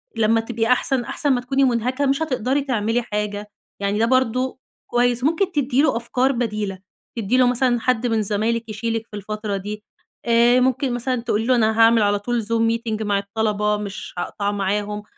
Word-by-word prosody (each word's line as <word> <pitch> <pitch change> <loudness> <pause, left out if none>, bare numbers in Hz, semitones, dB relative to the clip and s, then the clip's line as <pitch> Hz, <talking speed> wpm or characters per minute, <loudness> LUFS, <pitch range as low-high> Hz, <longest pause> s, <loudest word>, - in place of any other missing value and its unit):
لمّا 225 0 +3
تبقي 225 0 -2
أحسن، 250 +1 +2
أحسن 290 - -1
ما 245 - 0
تكوني 270 +2 +1
مُنهكة 255 +2 +1
مش 275 +2 +1
هتقدري 265 -1 0
تعملي 235 -3 0
حاجة، 210 -2 -4 0.3
يعني 200 +1 0
ده 230 - +3
برضه 255 +1 +1 0.3
كويس. 245 0 +1
ممكن 335 +6 +1
تدّي 280 -4 +1
له 305 -6 +2
أفكار 250 +3 0
بديلة. 210 -6 -3 0.4
تدّي 230 +3 +1
له 250 -1 +5
مثلًا 245 0 +2
حد 245 0 0
من 225 -2 +1
زمايلِك 220 +3 -1
يشيلِك 225 +1 -3
في 210 - -11
الفترة 210 0 -4
دي، 210 +2 -6 0.4
آآ 235 +1 +4
ممكن 255 0 +1
مثلًا 245 0 -1
تقولي 225 -1 -1
له 255 +1 +3
أنا 220 -1 +2
هاعمل 225 0 +6
على 205 0 +2
طول 235 +2 -2
Zoom 230 +2 0 0.2
meeting 220 -2 -4
مع 200 -1 +1
الطلبة 210 +1 -1
مش 205 -1 -7
هاقطع 200 +3 -2
معاهم. 205 +1 -2
230 Hz, 180 wpm, -21 LUFS, 210-250 Hz, 0.4 s, هاعمل